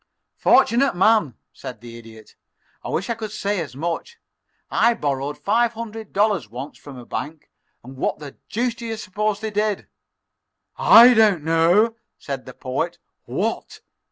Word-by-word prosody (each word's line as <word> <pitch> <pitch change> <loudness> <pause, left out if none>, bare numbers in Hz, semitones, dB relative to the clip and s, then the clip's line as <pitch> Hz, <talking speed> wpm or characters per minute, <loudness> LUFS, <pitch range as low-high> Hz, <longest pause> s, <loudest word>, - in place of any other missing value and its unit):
"Fortunate 255 -1 +4
man," 190 - +3 0.2
said 120 -4 -9
the 115 +1 -11
Idiot. 110 -2 -14 0.5
"I - - -6
wish 195 - -2
I 235 - 0
could 220 -2 -6
say 205 -1 -2
as 145 -5 -7
much. 170 - -4 0.5
I 235 0 +3
borrowed 145 -4 -2
five 230 +3 +1
hundred 225 -2 -8
dollars 200 - +1
once 130 +6 -8
from 140 -3 -11
a 120 - -10
bank, 155 +4 -6 0.3
and 130 +2 -12
what - - -1
the 145 -2 -10
deuce 240 +2 -1
do 235 0 -8
you 225 -1 -4
suppose 210 0 -2
they 220 -1 -3
did?" 210 -1 -1 0.9
"I 240 +2 +8
don't 210 -8 +4
know," 175 +8 +3 0.2
said - - -6
the - - -10
Poet. - - -3 0.3
"What?" - - -3
200 Hz, 155 wpm, -22 LUFS, 145-225 Hz, 0.9 s, I